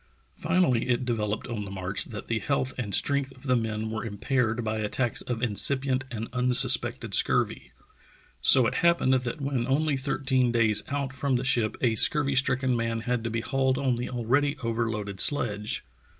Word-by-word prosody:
Finally 155 Hz, -9 st, 0 dB
it 125 Hz, +1 st, 0 dB
developed 105 Hz, -3 st, -3 dB
on 115 Hz, -4 st, -5 dB
the 100 Hz, -, -8 dB
march 95 Hz, 0 st, -2 dB
that 105 Hz, -3 st, -9 dB
the 115 Hz, -1 st, -1 dB
health 135 Hz, +3 st, -2 dB
and 105 Hz, -6 st, -4 dB
strength 140 Hz, -1 st, -1 dB
of 130 Hz, -, -20 dB
the 130 Hz, -2 st, +1 dB
men 110 Hz, -2 st, -3 dB
were 110 Hz, -, -4 dB
impaired 115 Hz, +2 st, -2 dB
by 110 Hz, 0 st, -3 dB
attacks 115 Hz, +3 st, -1 dB
of 120 Hz, -1 st, -5 dB
incipient 130 Hz, +3 st, +3 dB
and 115 Hz, -1 st, -6 dB
unsuspected 125 Hz, 0 st, +3 dB
scurvy. -, -, +2 dB, 0.7 s
So 130 Hz, -, +7 dB
it -, -, -1 dB
happened 170 Hz, -6 st, +2 dB
that 125 Hz, +4 st, -2 dB
when 135 Hz, -3 st, -2 dB
only 145 Hz, +2 st, 0 dB
thirteen 130 Hz, -2 st, -1 dB
days 110 Hz, -3 st, +3 dB
out 140 Hz, -2 st, -4 dB
from 135 Hz, -1 st, -1 dB
the 120 Hz, -, -1 dB
ship 120 Hz, -5 st, 0 dB
a 120 Hz, -3 st, +2 dB
scurvy 140 Hz, +5 st, +2 dB
stricken 130 Hz, -1 st, +1 dB
man 115 Hz, -1 st, -2 dB
had 120 Hz, 0 st, -2 dB
to -, -, -2 dB
be 115 Hz, 0 st, -3 dB
hauled 130 Hz, +1 st, -1 dB
on 135 Hz, -2 st, 0 dB
the 120 Hz, +1 st, -4 dB
alread}^ 140 Hz, +4 st, -1 dB
overloaded 115 Hz, -4 st, -3 dB
sledge. 105 Hz, -7 st, +1 dB
125 Hz, 180 wpm, -26 LUFS, 110-135 Hz, 0.7 s, So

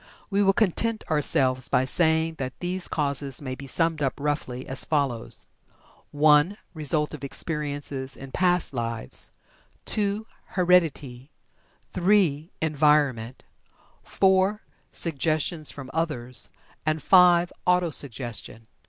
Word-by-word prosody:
We 200 Hz, +1 st, +2 dB
will 195 Hz, -1 st, +5 dB
content 220 Hz, +2 st, 0 dB
ourselves 135 Hz, -4 st, +2 dB
by 130 Hz, -, +2 dB
saying 160 Hz, +2 st, +1 dB
that 130 Hz, -1 st, -5 dB
these 180 Hz, +1 st, -2 dB
causes 140 Hz, -3 st, -1 dB
may 130 Hz, -3 st, -5 dB
be 135 Hz, +1 st, -9 dB
summed 165 Hz, +2 st, 0 dB
up, 135 Hz, -2 st, 0 dB
roughly, 140 Hz, -3 st, -3 dB
as 135 Hz, 0 st, +3 dB
follows: 140 Hz, -7 st, 0 dB, 0.6 s
(1) 150 Hz, +6 st, +4 dB, 0.2 s
Result 150 Hz, -1 st, +2 dB
of 150 Hz, -, -9 dB
experiences 145 Hz, -3 st, -3 dB
in 135 Hz, 0 st, -10 dB
past 180 Hz, -2 st, +2 dB
lives; 115 Hz, -2 st, -4 dB, 0.6 s
(2) 210 Hz, +1 st, 0 dB, 0.3 s
Heredity; 155 Hz, -8 st, +1 dB, 0.6 s
(3) 175 Hz, -5 st, +2 dB
Environment; 145 Hz, -6 st, +1 dB, 0.6 s
(4) 190 Hz, +2 st, +1 dB, 0.3 s
Suggestion 155 Hz, 0 st, -1 dB
from 140 Hz, -2 st, +1 dB
others; 130 Hz, -8 st, -1 dB, 0.3 s
and 155 Hz, -1 st, -1 dB
(5) 175 Hz, -2 st, +5 dB
Auto 180 Hz, -2 st, +2 dB
suggestion. 120 Hz, -5 st, -3 dB
150 Hz, 110 wpm, -25 LUFS, 135-175 Hz, 0.6 s, will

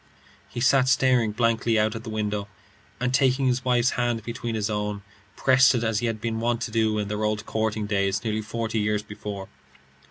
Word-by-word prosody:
He 110 Hz, -, -6 dB
sat 130 Hz, +1 st, +4 dB
staring 125 Hz, -3 st, +3 dB
blankly 115 Hz, 0 st, +1 dB
out 105 Hz, 0 st, +2 dB
at 115 Hz, -, -6 dB
the 115 Hz, -, -7 dB
window, 105 Hz, -1 st, -2 dB, 0.5 s
and 125 Hz, +1 st, -1 dB
taking 135 Hz, 0 st, +3 dB
his 130 Hz, 0 st, +1 dB
wife's 125 Hz, -1 st, +2 dB
hand 120 Hz, -2 st, -1 dB
between 115 Hz, 0 st, -4 dB
his 105 Hz, -1 st, -1 dB
own, 105 Hz, -1 st, -3 dB, 0.3 s
pressed 130 Hz, 0 st, +5 dB
it 120 Hz, -, 0 dB
as 110 Hz, -2 st, +1 dB
he 120 Hz, -, -1 dB
had 115 Hz, -1 st, -2 dB
been 110 Hz, 0 st, -2 dB
wont 115 Hz, 0 st, 0 dB
to 115 Hz, -, -3 dB
do 110 Hz, -1 st, +1 dB
in 105 Hz, -1 st, -1 dB
their 105 Hz, +1 st, -3 dB
old 105 Hz, 0 st, -1 dB
courting 110 Hz, -1 st, -1 dB
days 100 Hz, -1 st, 0 dB
nearly 110 Hz, -1 st, -1 dB
forty 115 Hz, +1 st, -3 dB
years 105 Hz, 0 st, 0 dB
before. 105 Hz, -2 st, -7 dB
110 Hz, 200 wpm, -25 LUFS, 105-120 Hz, 0.5 s, pressed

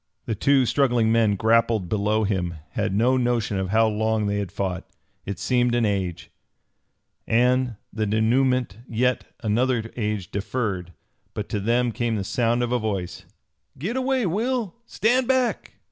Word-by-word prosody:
The 115 Hz, -, -2 dB
two 135 Hz, +5 st, +3 dB
struggling 120 Hz, -4 st, +2 dB
men 110 Hz, -3 st, +3 dB
grappled 115 Hz, -2 st, +2 dB
below 105 Hz, +3 st, +1 dB
him 90 Hz, -4 st, -1 dB, 0.2 s
had -, -, -1 dB
no 120 Hz, +6 st, +3 dB
notion 120 Hz, -5 st, 0 dB
of 95 Hz, -1 st, -2 dB
how 110 Hz, +2 st, +4 dB
long 110 Hz, 0 st, 0 dB
they 100 Hz, 0 st, 0 dB
had 100 Hz, -3 st, -4 dB
fought. 95 Hz, -3 st, -3 dB, 0.4 s
It 100 Hz, -, -3 dB
seemed 125 Hz, -1 st, +1 dB
an 120 Hz, -1 st, +2 dB
age, 95 Hz, -4 st, -2 dB, 1.0 s
and 125 Hz, +1 st, +2 dB, 0.2 s
the 110 Hz, -1 st, -1 dB
dénouement 120 Hz, +1 st, +1 dB
yet 125 Hz, +2 st, 0 dB, 0.2 s
another 115 Hz, 0 st, 0 dB
age 105 Hz, -5 st, -3 dB
deferred. 100 Hz, -4 st, -3 dB, 0.4 s
But 105 Hz, -, -4 dB
to 105 Hz, -, -1 dB
them 120 Hz, +4 st, +1 dB
came 115 Hz, 0 st, -1 dB
the 100 Hz, -, -2 dB
sound 120 Hz, +4 st, +1 dB
of 120 Hz, -, -2 dB
a 125 Hz, -, +2 dB
voice: 100 Hz, -5 st, -4 dB, 0.5 s
"Git 195 Hz, -, -3 dB
away, 260 Hz, -2 st, +1 dB
Will! 220 Hz, +3 st, -1 dB
Stand 245 Hz, +3 st, +1 dB
back!" 260 Hz, -2 st, 0 dB
115 Hz, 155 wpm, -24 LUFS, 105-125 Hz, 1.0 s, how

